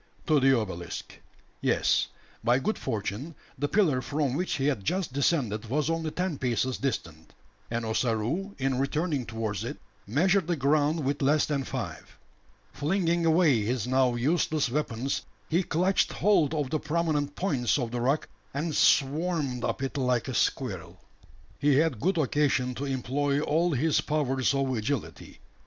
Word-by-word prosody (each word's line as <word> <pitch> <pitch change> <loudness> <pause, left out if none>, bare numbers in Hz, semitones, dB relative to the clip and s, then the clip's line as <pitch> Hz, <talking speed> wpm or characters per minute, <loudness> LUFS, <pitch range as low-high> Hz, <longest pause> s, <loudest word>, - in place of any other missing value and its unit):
To 155 -2 +4
the 135 -2 +4
obelisk. 90 -6 -6 0.4
Yes, - - +2 0.4
by 120 +2 +4
good 215 +11 -1
fortune, 120 +6 -4 0.2
the 145 - +1
pillar 155 -9 +2
from 145 -1 -1
which 180 +6 -1
he 135 - -1
had 135 -9 0
just 180 - -1
descended 130 -7 0
was 150 +4 +1
only 165 -1 -1
ten 180 -2 -2
paces 125 0 0
distant; 85 - -4 0.3
and 115 0 -2
Ossaroo, 120 - -1
in 135 -1 0
returning 145 -1 -1
towards 110 -3 -3
it, - - -5 0.3
measured 175 - +2
the 175 - +1
ground 150 +2 +1
with 140 +2 -1
less 145 +2 +3
than 140 -3 -1
five. - - -6 0.6
Flinging 170 +1 +1
away 160 -8 +4
his 115 +1 -1
now 130 -1 +2
useless 150 +1 +1
weapons, 135 -2 -1 0.3
he 170 +3 +2
clutched 185 +2 +1
hold 165 -7 +3
of 145 -4 -2
the 155 - +1
prominent 150 -3 -1
points 135 - +1
of 120 -4 -2
the 120 -1 -2
rock, 135 +5 +1 0.3
and 155 +2 -2
"swarmed" 145 -3 +2
up - - -2
it 135 +2 -3
like 125 -2 +1
a 130 - -3
squirrel. - - -1 0.6
He 145 -1 +3
had 150 -5 +2
good 185 +3 +1
occasion 140 -3 +1
to 135 +3 -4
employ 140 +2 0
all 160 +3 +1
his 150 +4 +2
powers 140 -3 0
of 135 -2 0
agility. 115 +1 -4
140 Hz, 155 wpm, -28 LUFS, 125-155 Hz, 0.6 s, To